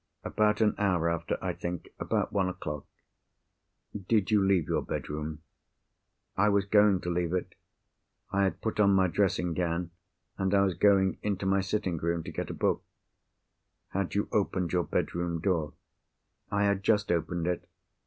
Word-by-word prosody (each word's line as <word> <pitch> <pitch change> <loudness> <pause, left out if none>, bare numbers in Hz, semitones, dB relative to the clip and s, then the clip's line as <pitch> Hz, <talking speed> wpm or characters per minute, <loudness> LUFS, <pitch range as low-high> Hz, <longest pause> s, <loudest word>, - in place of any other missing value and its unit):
"About 105 +1 +1
an 105 -1 +4
hour 90 -5 +2
after, 85 - -2
I - - -1
think. 85 -1 -5
About - - -1
one 95 -2 +2
o'clock." 75 -5 -6 1.2
"Did 110 -3 +2
you 105 -2 +4
leave 95 -5 +2
your - - +1
bedroom?" 75 +1 -5 0.9
"I 105 +2 +3
was 100 -1 +2
going 105 -2 +4
to 90 - -2
leave 85 0 -1
it. 90 - -2 0.8
I 100 0 +2
had 95 - -2
put 110 -1 -3
on 100 -1 +5
my 95 -1 +4
dressing 90 -2 +1
gown; 85 0 -1 0.5
and 95 +1 +1
I 100 - +5
was 95 -2 +1
going 95 +1 +3
into 100 -2 -2
my 95 0 +3
sitting 95 -2 -1
room 85 +1 -1
to - - -7
get - - -4
a - - -3
book——" - - +1 1.1
"Had 100 -1 -2
you 100 - +1
opened 95 -4 0
your 90 -1 +2
bedroom 85 -1 -1
door?" 80 -4 0 0.8
"I 100 0 +1
had 100 -1 +2
just 105 0 +2
opened 85 0 -1
it." 90 0 -2
95 Hz, 165 wpm, -29 LUFS, 85-100 Hz, 1.2 s, on